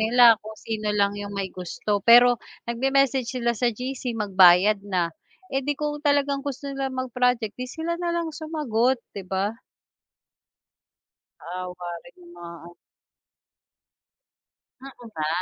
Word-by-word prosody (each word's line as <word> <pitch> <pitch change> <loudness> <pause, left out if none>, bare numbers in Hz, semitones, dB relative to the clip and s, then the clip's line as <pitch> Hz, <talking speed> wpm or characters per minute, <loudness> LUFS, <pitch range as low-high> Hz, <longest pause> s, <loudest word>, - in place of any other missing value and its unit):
nila 230 0 +6
kung 220 0 -10
sino 215 -1 -4
lang 200 0 +2
yung 205 0 -6
may 195 -2 -3
gusto 195 +3 -3
pero, 240 +3 +6 0.2
nag-me-message 265 +1 +1
sila 240 -2 0
sa 240 +2 0
GC 250 +1 -4
magbayad 195 0 +5
na, 175 -3 0 0.4
eh, 270 - +1
di 290 +1 -2
kung 295 0 -3
talagang 285 -1 +1
gusto 280 0 -6
nila 270 0 -2
mag-project 250 -3 -1
'di 255 0 -6
sila 335 +4 -4
na 350 - -2
lang 330 -2 -2
sumagot, 295 -6 0 0.2
'di 190 -2 -8
ba? 195 +3 -1 1.9
Naawa 180 0 -7
rin - - -17
yung 175 0 -15
mga 170 0 -9
ano. 175 0 -13 2.1
Mm 275 0 -9 0.2
nga. 155 -8 -4
235 Hz, 135 wpm, -24 LUFS, 200-270 Hz, 2.1 s, nila